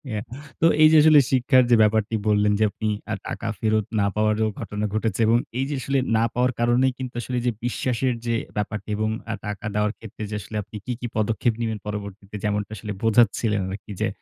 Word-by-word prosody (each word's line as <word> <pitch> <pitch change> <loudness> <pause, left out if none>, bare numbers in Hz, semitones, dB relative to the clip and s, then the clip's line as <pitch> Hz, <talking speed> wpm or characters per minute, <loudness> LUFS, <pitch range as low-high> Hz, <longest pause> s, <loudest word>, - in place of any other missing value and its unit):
এ - - -1 0.4
তো - - +5 0.2
এই 155 - +9
যে 160 - +7
আসলে 155 -1 +8
শিক্ষার 130 0 +4
যে - - +8
ব্যাপারটি 110 +1 +1
বললেন 105 0 +3
যে - - +4
আপনি 110 - -4 0.2
আ - - +1
টাকা 115 - -4
ফেরত 110 -2 +1
না 100 - +3
পাওয়ারও 110 +1 +2
ঘটনা 105 +1 -3
ঘটেছে 110 -1 -1
এবং 115 +1 +5 0.2
এই 135 - +1
যে 145 - -2
আসলে 135 +1 0 0.2
না 115 - +3
পাওয়ার 125 +1 +2
কারণেই 125 +2 +3
কিন্তু 130 -1 -6
আসলে 125 +1 -3
যে 120 - +3
বিশ্বাসের 125 +1 0
যে 115 -1 +1 0.2
ব্যাপারটি 105 +1 -3
এবং 110 0 0 0.2
আ - - -1
টাকা 105 +1 -5
দেওয়ার 105 0 +1
ক্ষেত্রে 110 -1 -9 0.4
আপনি 105 +2 -14
কী, - - -3
কী 120 - -4
পদক্ষেপ 110 +2 +1
নিবেন? 110 -1 -1
পরবর্তীতে 100 0 -6
যেমনটা 105 0 -1
আসলে 105 +1 -5
বোঝাচ্ছিলেন 110 -2 +3
আরকি 100 +2 -8
যে - - +2
110 Hz, 200 wpm, -24 LUFS, 105-120 Hz, 0.4 s, এই